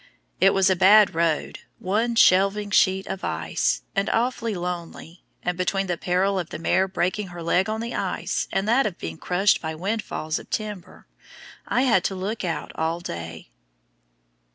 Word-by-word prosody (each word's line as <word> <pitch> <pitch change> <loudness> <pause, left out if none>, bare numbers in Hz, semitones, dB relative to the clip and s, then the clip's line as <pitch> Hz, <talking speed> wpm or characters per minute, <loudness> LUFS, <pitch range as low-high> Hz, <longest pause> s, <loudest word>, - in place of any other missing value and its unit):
It 195 +1 +5
was 195 -1 +4
a 190 - +3
bad 200 +3 +6
road, 165 -2 -1 0.2
one 225 +5 -1
shelving 200 0 +4
sheet 190 0 +3
of 195 - -6
ice, - - -1
and 195 0 0
awfully 230 -2 0
lonely, 175 -1 -6 0.2
and 180 - -1
between 195 +2 0
the 180 -2 -1
peril 185 +3 0
of 175 - -5
the - - -6
mare 185 +3 +1
breaking 190 +2 -1
her 175 -1 -8
leg 180 +4 +1
on 220 +1 -2
the 235 +1 -5
ice - - -2
and 195 +1 -1
that 240 +3 +3
of 185 - -6
being 80 0 -7
crushed 190 +3 +2
by 160 -1 -4
windfalls 180 -3 -3
of - - -14
timber, 210 -4 -5 0.6
I 250 - +1
had 220 -9 +3
to 195 - -1
look 200 +4 -4
out 170 -3 -3
all 165 +1 -1
day. 80 - -7
190 Hz, 175 wpm, -24 LUFS, 175-210 Hz, 0.6 s, bad